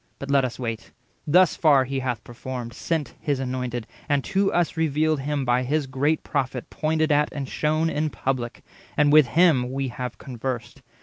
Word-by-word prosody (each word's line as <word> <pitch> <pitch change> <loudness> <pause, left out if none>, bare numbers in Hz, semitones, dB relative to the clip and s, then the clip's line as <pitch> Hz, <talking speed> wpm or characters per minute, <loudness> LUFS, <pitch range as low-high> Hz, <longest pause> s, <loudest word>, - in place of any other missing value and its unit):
But 140 0 -5
let 140 -1 +4
us 125 -2 -3
wait; 115 -3 -5 0.3
thus 180 +4 +5
far 145 -5 +5
He 135 +1 -2
hath 125 -3 -3
performed— 120 0 -6
Sent 160 +3 -2
his 145 -4 -1
Anointed, 125 -2 -3 0.2
and 140 -2 +2
to 195 0 +1
us 175 -2 +1
revealed 155 -1 +1
him 145 +1 -1
50 - - -3
By 120 +1 +2
his 145 +3 0
great 140 +4 0
Prophet 130 -3 -3
pointed 155 0 0
at 150 0 +3
and 140 -2 -4
shown 155 +4 0
In 155 -1 0
public, 130 -4 -3 0.3
and 150 0 +4
with 155 -4 +7
him 135 -3 +3
we 135 0 -2
have 125 0 -5
conversed. 125 0 -5
135 Hz, 185 wpm, -24 LUFS, 125-155 Hz, 0.3 s, with